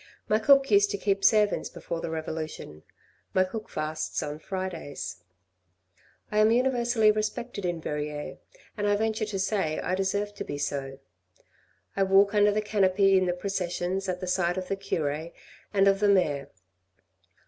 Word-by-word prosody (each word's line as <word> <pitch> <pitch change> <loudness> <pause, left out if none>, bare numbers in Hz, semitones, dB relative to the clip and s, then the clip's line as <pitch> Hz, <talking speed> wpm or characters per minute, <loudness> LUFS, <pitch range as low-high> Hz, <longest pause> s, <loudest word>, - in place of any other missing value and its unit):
My 215 - +3
cook 275 +2 +5
used 200 0 +5
to 200 - -2
keep 195 0 0
servants 210 0 +3
before 170 -1 -6
the - - -4
revolution, 155 - -5 0.5
my 185 - +5
cook 215 +4 -6
fasts 155 0 -3
on 150 0 -5
Fridays. 170 - -5 1.1
I 210 - +1
am 215 +1 +6
universally 240 -2 +3
respected 215 0 -3
in 175 -1 -1
Verrieres, 150 -1 -4 0.4
and 205 -1 -1
I 205 - +3
venture 220 +1 0
to 205 -2 -3
say 190 -5 0
I 180 - -2
deserve 200 +2 -1
to 205 - -6
be 145 - -5
so. 135 -1 -3 1.0
I 195 - 0
walk 195 +1 +4
under 205 0 +4
the 215 +1 0
canopy 195 -2 +3
in 185 -1 +3
the 175 - +1
processions 185 0 -2
at 180 0 -3
the - - -3
side 180 0 0
of 185 -1 -4
the 195 - 0
cure 160 -5 -2 0.4
and 195 -1 +3
of 195 0 +4
the 205 0 +3
mayor. 150 -8 +2
195 Hz, 165 wpm, -27 LUFS, 165-210 Hz, 1.1 s, am